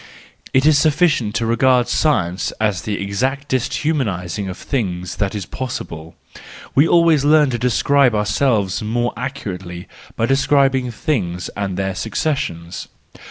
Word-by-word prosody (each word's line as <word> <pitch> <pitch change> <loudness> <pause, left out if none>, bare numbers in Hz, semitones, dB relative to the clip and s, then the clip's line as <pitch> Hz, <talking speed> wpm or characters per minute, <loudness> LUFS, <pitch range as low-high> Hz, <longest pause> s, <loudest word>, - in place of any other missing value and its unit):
It 130 +1 +3
is 155 -1 +5
sufficient 150 -8 +2
to 115 - 0
regard 125 +2 +3
science 95 - 0
as 105 -5 0
the 105 +1 -3
exactest 130 +6 -1
humanising 100 - -1
of 90 - -6
things 90 -9 -3
that 100 +1 -1
is 100 -3 -4
possible; 80 -11 -6 0.6
we 145 +4 +5
always 165 -4 +4
learn 150 -1 +4
to 120 - -2
describe 125 +1 +3
ourselves 105 -2 +1
more 120 +3 -1
accurately 95 -9 -6 0.3
by 115 - +1
describing 135 -1 +2
things 100 - -2
and 100 -2 -3
their 95 0 -1
successions. 95 - -3
120 Hz, 130 wpm, -19 LUFS, 95-140 Hz, 0.6 s, is